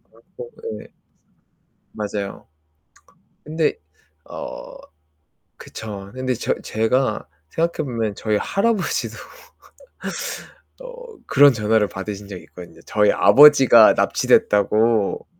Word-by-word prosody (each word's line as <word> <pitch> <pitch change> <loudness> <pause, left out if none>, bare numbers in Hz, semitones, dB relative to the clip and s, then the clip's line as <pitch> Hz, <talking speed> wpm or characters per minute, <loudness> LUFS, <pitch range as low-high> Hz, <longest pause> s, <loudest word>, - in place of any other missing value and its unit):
것 - - -41
같고 480 0 -13
그 460 0 -8 1.1
맞아요. 105 -2 -6 1.0
근데 155 +1 -1 0.5
어 - - -9 0.8
그쵸. 100 -3 -9
근데 130 0 -2
저 120 - -2
제가 110 +1 -1 0.2
생각해 165 - -2
보면 115 -4 -3
저희 110 -1 -1
할아버지도 200 - -1 1.7
어 - - -12
그런 145 -2 +6
전화를 105 -1 +1
받으신 100 +1 -7
적이 95 -3 -9
있거든요. 85 -2 -14
저희 105 -1 +2
아버지가 130 -1 +7
납치됐다고. 105 +1 +1
110 Hz, 215 characters per minute, -20 LUFS, 105-150 Hz, 1.7 s, 아버지가